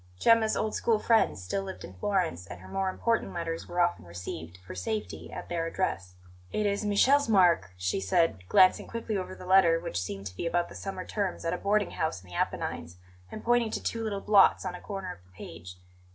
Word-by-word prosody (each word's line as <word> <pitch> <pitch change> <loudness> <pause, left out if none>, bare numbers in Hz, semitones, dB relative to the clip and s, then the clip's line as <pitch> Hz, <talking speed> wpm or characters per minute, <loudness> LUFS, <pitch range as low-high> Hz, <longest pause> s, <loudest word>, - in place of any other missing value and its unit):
Gemma's 225 - +4
old 215 0 -1
school 230 -2 +2
friends 220 - +2
still 195 - -2
lived 190 -1 -7
in 95 - -9
Florence, 160 - -1
and 85 - -9
her 95 - -12
more 190 - -1
important 230 +3 -1
letters 165 -1 -4
were 175 - -4
often 175 - +2
received, 85 -1 -7
for - - -8
safety, 90 -4 -4
at - - -7
their 165 -1 -2
address. 95 - -2 0.4
"It 210 - 0
is 200 +1 0
Michele's 255 +7 +4
mark," 175 - +4
she 90 +1 -1
said, 95 - +1
glancing 185 0 +5
quickly 230 -2 -4
over 185 -1 -4
the - - -11
letter, 180 -3 +5
which 85 - -3
seemed 95 +2 -5
to 90 -2 -6
be 170 - -3
about 175 +1 0
the - - -11
summer 190 -2 -5
terms 200 -5 -3
at 165 - 0
a - - -1
boarding 205 0 +1
house 160 - -2
in 90 - -17
the - - -8
Apennines, 85 +2 -3 0.3
and 215 - -7
pointing 240 -1 +3
to - - -4
two 230 -1 -2
little 205 -3 -2
blots 200 -2 +5
on 185 - -3
a 180 - -9
corner 195 -3 -5
of 90 - -19
the 90 - -25
page. 90 0 -10
175 Hz, 220 wpm, -29 LUFS, -, 0.4 s, glancing